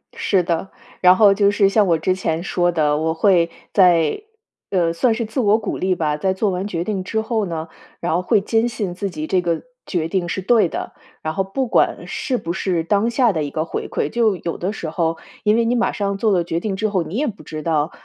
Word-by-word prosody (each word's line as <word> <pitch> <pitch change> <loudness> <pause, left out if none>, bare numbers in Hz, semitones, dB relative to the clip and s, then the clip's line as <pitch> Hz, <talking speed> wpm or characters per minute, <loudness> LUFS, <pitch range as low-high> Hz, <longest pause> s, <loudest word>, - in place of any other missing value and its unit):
是 195 -3 +1
的， 170 +2 -2 0.3
然 180 0 +7
后 200 0 +6
就 200 0 +3
是 205 -1 +3
像 210 0 +3
我 165 -2 +3
之 185 +4 0
前 165 -3 -2
说 175 -2 +1
的， 150 -3 +1
我 160 +1 0
会 170 -1 +3 0.2
在 175 - +4 0.5
呃， 170 -4 +1
算 230 +7 +2
是 230 +1 -2
自 220 +5 -4
我 215 -2 +4
鼓 210 - -4
励 185 0 0
吧， 150 -3 -1
在 190 +4 0
做 200 +2 0
完 185 +2 -2
决 170 -4 -2
定 195 -1 -3
之 220 +4 -1
后 220 -2 -1
呢， 165 -2 -4 0.3
然 170 - -1
后 180 - +1
会 210 +4 +3
坚 225 +3 +1
信 200 -6 -3
自 200 +1 -3
己 155 -3 -5
这 185 +1 +2
个 170 -2 -1 0.2
决 165 -4 -1
定 175 0 -1
是 190 - -2
对 220 0 +4
的。 - - -5 0.3
然 155 0 -3
后 195 - 0
不 250 +7 -2
管 - - +1
是 255 -3 -2
不 170 -4 -4
是 180 -3 -1
当 205 +6 +1
下 235 -2 +3
的 155 -2 -1
一 145 - -3
个 155 0 -2
回 - - -4
馈， 145 - -1
就 220 -2 +2
有 170 - -4
的 185 +4 -2
时 165 - -5
候 165 0 -1 0.3
因 210 +1 +3
为 235 - +2
你 240 +2 +1
马 240 0 +1
上 200 -2 -2
做 215 +1 +1
了 175 -3 +2
决 165 0 -2
定 200 +1 -3
之 215 +3 0
后， 190 -4 0
你 165 +4 -7
也 290 +5 0
不 210 -3 -7
知 155 -1 -6
道， 155 -1 0
185 Hz, 265 characters per minute, -20 LUFS, 165-210 Hz, 0.5 s, 然